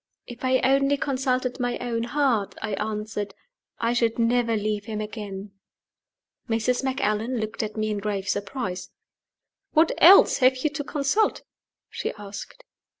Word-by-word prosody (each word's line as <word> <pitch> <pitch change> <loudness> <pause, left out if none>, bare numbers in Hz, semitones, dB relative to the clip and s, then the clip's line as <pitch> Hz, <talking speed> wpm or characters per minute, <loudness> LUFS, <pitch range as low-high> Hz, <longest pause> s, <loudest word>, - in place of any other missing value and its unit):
"If 240 - -11
I 260 0 +3
only 275 +2 +3
consulted 255 -2 -1
my 245 -1 -1
own 235 -2 -2
heart," 245 -7 0
I 215 -2 -3
answered, 210 -1 -3 0.4
"I 230 +1 0
should 230 -2 +1
never 230 -1 +2
leave 210 0 -2
him 220 -2 -4
again." 210 -2 -6 1.0
Mrs. 230 +3 +1
Macallan 255 -3 0
looked 215 -1 -3
at 215 0 -5
me 215 0 0
in 210 - -2
grave 200 -2 -3
surprise. 195 -3 -3 0.8
"What 315 +1 +5
else 375 +5 +8
have 260 0 +4
you 305 - +1
to 300 -1 -4
consult?" 295 +10 0 0.5
she - - -3
asked. 205 - -9
230 Hz, 145 wpm, -25 LUFS, 210-260 Hz, 1.0 s, else